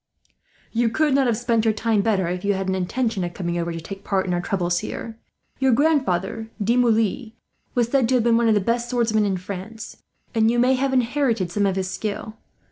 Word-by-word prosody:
"You 235 0 +1
could 300 +4 +1
not 270 -1 +3
have 230 -3 +1
spent 235 -2 +1
your 220 -2 +2
time 220 -1 +1
better, 195 -4 +1
if 180 +1 -3
you 200 0 +1
had 190 0 -3
an 190 - 0
intention 195 +2 -1
of 175 0 -5
coming 175 -2 -2
over 170 0 -2
to 165 - -5
take 195 +4 -9
part 195 -2 0
in 180 - -1
our 175 - 0
troubles 175 -3 0
here. 225 +5 -6 0.4
Your 265 -2 +3
grandfather, 225 - +1
De 220 +3 +1
Moulins, 225 -1 +1 0.4
was 240 -2 +2
said 260 -3 +2
to 255 -1 +3
be 235 0 +2
one 230 0 +3
of 220 - +4
the 205 - +2
best 235 +4 -1
swordsmen 225 -4 +1
in 190 -2 0
France; 195 +4 -8 0.4
and 225 -1 +3
you 240 - +1
may 250 +2 +4
have 265 +1 0
inherited 245 -6 +1
some 200 +2 +1
of 190 - 0
his 190 -1 -2
skill. 215 0 -4
220 Hz, 220 wpm, -23 LUFS, 190-240 Hz, 0.4 s, of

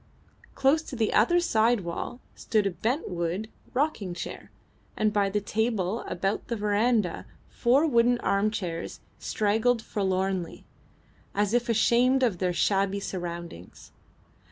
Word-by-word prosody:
Close 275 +4 +3
to 310 - -8
the 225 -3 0
other 295 +12 +4
side 230 - +2
wall 175 +7 -5
stood 215 -2 0
a 195 - +1
bent 240 - -2
wood 175 +5 -3 0.2
rocking 245 - -1
chair, 180 - -7 0.5
and 215 -1 +1
by 200 -2 +2
the 210 +2 0
table 215 -1 -1
and - - -8
about 195 +3 -2
the 235 - -2
verandah 210 -2 +1 0.2
four 260 +6 +3
wooden 240 -4 +3
armchairs 200 -4 -1 0.2
straggled 220 +3 +1
forlornly, 190 -3 -2 0.7
as 205 +1 +1
if 240 0 +1
ashamed 245 +4 +3
of 210 -8 +1
their 180 -1 +1
shabby 195 +2 +1
surroundings. 170 - -7
210 Hz, 130 wpm, -27 LUFS, 190-240 Hz, 0.7 s, other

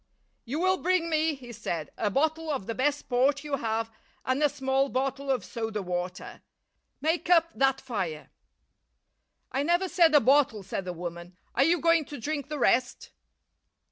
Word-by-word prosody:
"You 270 +6 -3
will 375 +1 +2
bring 355 -2 +1
me," 315 0 +2
he 250 -3 -11
said, 175 -8 -4
"a 210 - 0
bottle 315 +7 0
of 270 -10 -2
the 230 - -3
best 285 +4 -1
port 270 +3 +2
you 290 -2 -2
have 225 -1 -2 0.3
and 260 +3 0
a 295 - +4
small 270 -1 0
bottle 270 +2 -2
of 255 -7 0
soda 220 -3 -4
water. 180 0 -5 0.6
Make 330 +3 0
up 335 -1 +5
that 270 0 +2
fire." 190 -13 -4 1.2
"I 270 - 0
never 345 +5 +2
said 335 -4 +4
a - - +9
bottle," 260 -6 +3
said 195 0 -4
the 180 - -3
woman. 175 +1 -7 0.2
"Are 265 - +3
you 335 +3 +3
going 330 -1 +3
to 290 - -8
drink 290 +3 -3
the 300 - -3
rest?" 250 -1 +1
270 Hz, 175 wpm, -28 LUFS, 225-310 Hz, 1.2 s, a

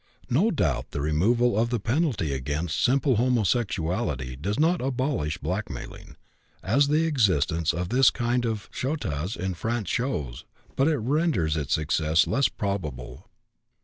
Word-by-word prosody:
No 170 - +3
doubt 170 - -1
the - - -5
removal 100 +12 +2
of 115 +2 +1
the 120 -1 -1
penalty 115 - 0
against 75 +5 -2
simple 135 -1 +3
homosexuality 100 - 0
does 100 - -3
not 165 +3 +2
abolish 130 - -1
blackmailing, - - -6 0.5
as 135 +9 +3
the 155 +3 +2
existence 90 - +2
of 90 +1 -3
this 130 +2 +5
kind 120 +1 -1
of 110 -4 -3
chantage 100 - -3
in 95 +2 -2
France 110 +3 -3
shows, 75 - -2 0.3
but 135 - +2
it 160 -2 +2
renders 125 - +1
its 75 -5 0
success 80 +1 +2
less 135 - +2
probable. 75 - -5
110 Hz, 140 wpm, -26 LUFS, 80-130 Hz, 0.5 s, this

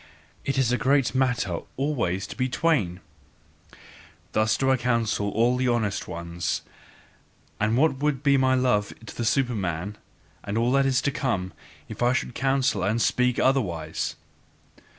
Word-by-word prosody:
It 140 - -1
is 130 -3 +2
a 125 - +1
great 135 +3 +2
matter 125 -9 0 0.2
always 120 -10 -1
to - - -8
be 130 0 -1
twain." 125 - 0 1.3
Thus 110 0 +2
do 135 0 +2
I 130 - +3
counsel 115 -4 0
all 120 +4 +2
honest 110 -4 -1
ones; 85 0 -3 1.0
and 110 +2 +1
what 150 0 +3
would 145 -2 0
be 140 -2 +4
my 130 -1 +3
love 125 -5 +1
to - - -10
the 120 - -3
Superman, 105 - -1 0.4
and 100 - -4
to - - +2
all 120 +1 +2
that 135 0 +3
is 130 -1 +1
to 140 - +1
come, 115 -10 -2 0.3
if - - -9
I 120 +1 +3
should 130 - -2
counsel 135 -5 +1
and 105 +5 +1
speak 125 +1 +2
otherwise! 85 - 0
120 Hz, 155 wpm, -25 LUFS, 105-135 Hz, 1.3 s, be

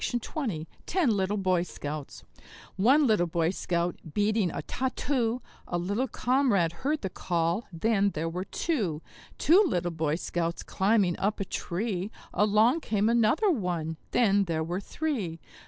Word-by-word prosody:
Ten 345 -9 +2
Little 195 +1 0
Boy 185 -3 +2
Scouts 150 -4 -6 0.5
One 265 +10 +5
little 210 -8 +3
Boy 165 0 +1
Scout 175 -2 -1 0.2
beating 210 -2 +2
a - - -5
tat 260 0 -3
too; 245 -3 0 0.2
A 175 - -1
little 200 +9 -1
comrade 245 -9 +2
heard 295 +2 0
the 190 - -2
call 170 +5 -1
then 200 +3 +2
there 165 -3 -3
were 180 +3 -3
two. 200 - -2 0.3
Two 355 +8 +6
little 175 - 0
Boy 160 -2 0
Scouts 170 0 -2
climbing 195 -3 +2
up 210 +3 0
a 195 - -1
tree; 190 +1 -3 0.2
Along 215 +8 +4
came 215 -6 +1
another 235 - +3
one 175 - -2
then 200 -4 +3
there 160 -2 -1
were 175 +4 -3
three. 210 - -3
195 Hz, 145 wpm, -28 LUFS, 170-235 Hz, 0.5 s, Two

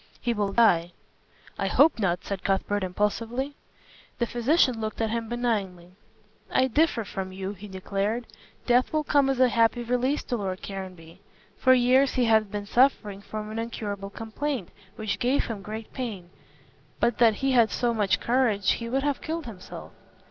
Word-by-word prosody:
He 240 - 0
will 205 -2 -1
die." 180 -6 +3 0.7
"I - - 0
hope 295 -4 +4
not," 180 -4 0
said 195 -2 -4
Cuthbert, 195 +1 0
impulsively. 225 +8 -1 0.6
The 235 - +1
physician 240 0 +2
looked 215 0 -4
at 225 -1 0
him 230 -1 -3
benignly. 200 -8 -2 0.6
"I 260 0 +2
differ 290 -3 +2
from 190 -2 -5
you," 190 +1 -5
he 205 +1 -10
declared, 200 +4 -2 0.4
"death 245 +1 +3
will 310 -1 +1
come 285 -2 +3
as 270 -2 0
a 255 - +6
happy 230 +1 +2
release 250 +4 0
to 245 - -2
Lord 190 -3 -4
Caranby. 185 -3 -8 0.4
For 260 -1 +5
years 255 +2 +3
he 250 - +3
has 220 -1 +4
been 205 0 -5
suffering 210 -4 +2
from 215 +1 -6
an 220 - -4
incurable 205 -4 -4
complaint 225 - -4 0.3
which 215 -3 -3
gave 255 +3 +1
him 220 -4 -5
great 215 +2 -7
pain. 205 -9 -5 0.7
But 235 - +1
that 230 -3 +5
he 270 +5 0
had 235 -3 +5
so 235 +5 0
much 205 -4 +1
courage, 230 -6 +2
he 230 0 -3
would 270 +3 0
have 285 -1 -1
killed 325 0 -4
himself." 200 -6 -9
225 Hz, 170 wpm, -26 LUFS, 200-250 Hz, 0.7 s, a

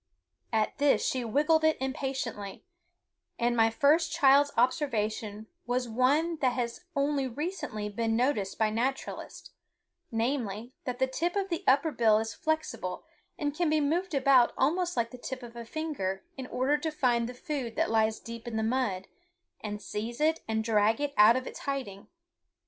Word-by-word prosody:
At 220 +5 0
this 285 -1 +3
she 255 -2 0
wiggled 300 +7 +2
it 315 0 +3
impatiently, 265 -7 -4 0.7
and 240 0 +1
my 225 -1 +4
first 300 +7 +3
child's 285 +1 +5
observation 220 -5 0 0.2
was 245 0 0
one 285 +8 +2
that 260 -4 +1
has 240 +6 -3
only 280 -1 +1
recently 260 - -4
been 225 +2 -1
noticed 225 -6 0
by 220 -1 +2
naturalists, 255 +5 -3 0.6
namely, 230 -1 -2
that 250 -1 -3
the 260 - +3
tip 335 +8 -2
of 395 -1 -1
the 335 - -2
upper 280 +4 +4
bill 225 -5 +4
is 225 0 -2
flexible 315 +6 -3 0.3
and 290 -1 -1
can 345 0 +1
be 310 0 +3
moved 330 +4 0
about 265 -2 +5
almost 350 +6 +1
like 230 -1 0
the 250 - -10
tip 255 +1 -6
of 235 0 -10
a 235 -1 -7
finger 225 -10 -3
in 260 -2 -6
order 275 +4 +1
to 315 - -2
find 240 -5 +1
the 250 - -8
food 265 -5 -4
that - - +1
lies 220 -1 +2
deep 230 +1 -9
in 225 -2 -3
the 220 - 0
mud, 220 -6 -1 0.6
and 210 -1 -5
seize 225 +4 -5
it 315 +1 +2
and 220 0 0
drag 220 0 +2
it 290 -1 -2
out 215 +3 +7
of 255 0 -2
its - - -7
hiding. 255 -8 -4
255 Hz, 170 wpm, -29 LUFS, 225-290 Hz, 0.7 s, out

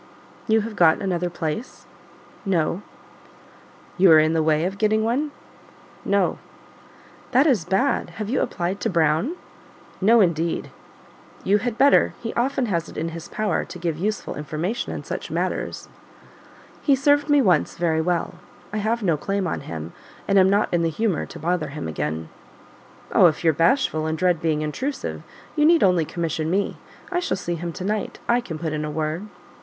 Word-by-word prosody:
"You 220 0 +4
have 215 0 -6
got 165 -4 +5
another 180 -2 -1
place?" 170 +7 -5 0.6
"No." 180 -2 0 1.2
"You 185 -2 +7
are 160 - +9
in 155 +1 +4
the 165 - +2
way 155 +1 +2
of 195 +2 -4
getting 215 0 +2
one?" 255 +7 0 0.7
"No." 200 -2 +1 0.9
"That 265 +4 +5
is 240 - +2
bad; 225 +9 +1
have 215 -2 -3
you 255 +5 0
applied 180 +3 -2
to - - -1
Brown?" 165 - +1 0.7
"No, 225 +5 +6
indeed." 170 -4 +1 0.7
"You 205 +2 +3
had 235 +1 -3
better; 280 +1 +4
he 225 - -5
often 260 +2 0
has 170 -6 -2
it - - -11
in 165 +2 -2
his 165 0 -8
power 210 -6 -1
to - - -9
give 170 -2 -2
useful 210 +3 -2
information 155 - -3
in - - -5
such - - -5
matters." - - -3 0.9
"He 280 - +4
served 290 +2 +2
me 290 0 +5
once 185 - +2
very 160 -2 +1
well; 175 +1 -1 0.3
I - - -1
have 220 +2 -1
no 170 -5 +2
claim 195 +5 -2
on 175 - -2
him, 80 0 -7 0.3
and 195 -1 +4
am 190 0 +5
not 205 0 +1
in 175 - +3
the 165 - +1
humour 190 0 -1
to - - -10
bother 165 -1 -1
him 145 - -6
again." 80 +1 -3 0.8
"Oh, - - +7
if 155 0 -1
you're 160 -1 +4
bashful, 165 - +2
and 160 0 -1
dread 175 -1 +1
being 155 -2 0
intrusive, 260 - -3 0.3
you 300 - +2
need 330 +1 +5
only 180 -4 +3
commission 160 -1 -2
me. 195 +3 0 0.3
I 355 - +1
shall 350 - -1
see 175 -2 -3
him 170 0 -4
to 180 - -6
night; 210 +2 -2
I 240 +1 +3
can 165 -9 -6
put 160 -1 -3
in 150 0 -2
a 150 - -3
word." 155 +5 -3
180 Hz, 180 wpm, -23 LUFS, 160-220 Hz, 1.2 s, are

